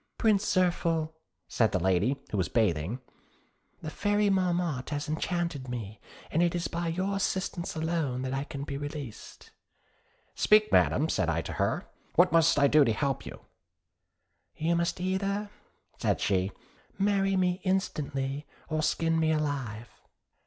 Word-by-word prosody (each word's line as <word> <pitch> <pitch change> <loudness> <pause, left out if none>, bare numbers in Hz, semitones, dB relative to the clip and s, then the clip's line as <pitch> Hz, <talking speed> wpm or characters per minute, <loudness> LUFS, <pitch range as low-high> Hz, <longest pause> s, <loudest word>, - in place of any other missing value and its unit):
'Prince 210 -3 +3
Zirphil,' 170 -4 +1 0.3
said 110 -2 +2
the 95 - +1
lady, 95 +9 +2
who 105 - -1
was 90 - 0
bathing, 105 -1 +1 0.8
'the 155 - -3
Fairy 205 +1 +1
Marmotte 175 -7 0
has 145 +1 -3
enchanted 160 -3 -2
me, 110 -3 -5 0.3
and 165 - +2
it 175 0 +2
is 175 - -1
by 170 0 -3
your 185 +4 -1
assistance 190 -3 -2
alone 160 -6 -1
that 130 0 -3
I 135 +1 -1
can 140 -1 -6
be 140 -1 -4
released.' 145 -5 -8 0.8
'Speak, 215 0 +4
Madam,' 150 +4 +4
said 95 - 0
I 80 0 0
to - - -5
her: - - 0 0.3
'what 180 +2 +5
must 165 -2 +4
I 140 - +5
do 150 +1 +6
to 115 - +2
help 135 +4 -1
you?' - - -9 1.2
'You 165 +2 +1
must 170 +1 0
either,' 195 +3 -1 0.5
said - - +1
she, 95 0 +1 0.5
'marry 195 -1 +2
me 180 0 +1
instantly 145 -7 -1 0.2
or 155 0 0
skin 165 +1 +1
me 160 0 +2
alive.' 135 -8 -2
155 Hz, 150 wpm, -29 LUFS, 135-180 Hz, 1.2 s, do